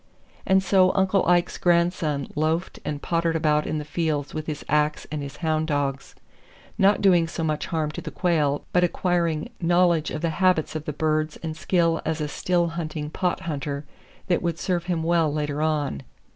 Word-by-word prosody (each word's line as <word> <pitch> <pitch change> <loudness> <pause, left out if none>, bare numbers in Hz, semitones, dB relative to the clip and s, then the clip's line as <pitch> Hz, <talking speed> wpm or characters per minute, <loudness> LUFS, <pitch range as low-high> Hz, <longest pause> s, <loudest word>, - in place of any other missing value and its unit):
And 190 0 +4
so 190 -1 +4
Uncle 190 0 +3
Ike's 175 0 +2
grandson 170 -5 +1
loafed 160 +4 -1
and 145 -1 -4
pottered 165 -1 0
about 150 -1 +2
in 155 - -1
the 150 - -4
fields 150 -2 -2
with 155 0 -5
his 150 -2 -5
ax 150 0 +1
and 150 -1 -3
his 140 0 -7
hound 155 0 +1
dogs, 140 -2 -2 0.6
not 200 +1 +3
doing 175 -4 +5
so 165 0 -4
much 155 -1 -1
harm 155 -2 -1
to - - -6
the - - -6
quail 150 -6 0
but 180 - +4
acquiring 170 -3 0
knowledge 175 -2 +3
of 155 - -4
the 165 - +1
habits 180 -5 +2
of 155 -1 -4
the - - -2
birds 155 +1 0
and 160 -1 -4
skill 165 -1 +1
as 160 0 -2
a 150 - -1
still 175 +3 0
hunting 155 -2 -4
pot 180 +1 -1
hunter 145 -2 -4 0.4
that 175 -3 +1
would 170 -2 -1
serve 175 -1 -1
him 175 -3 -1
well 165 -2 +2
later 150 0 -2
on. 150 - 0
160 Hz, 185 wpm, -24 LUFS, 150-175 Hz, 0.6 s, doing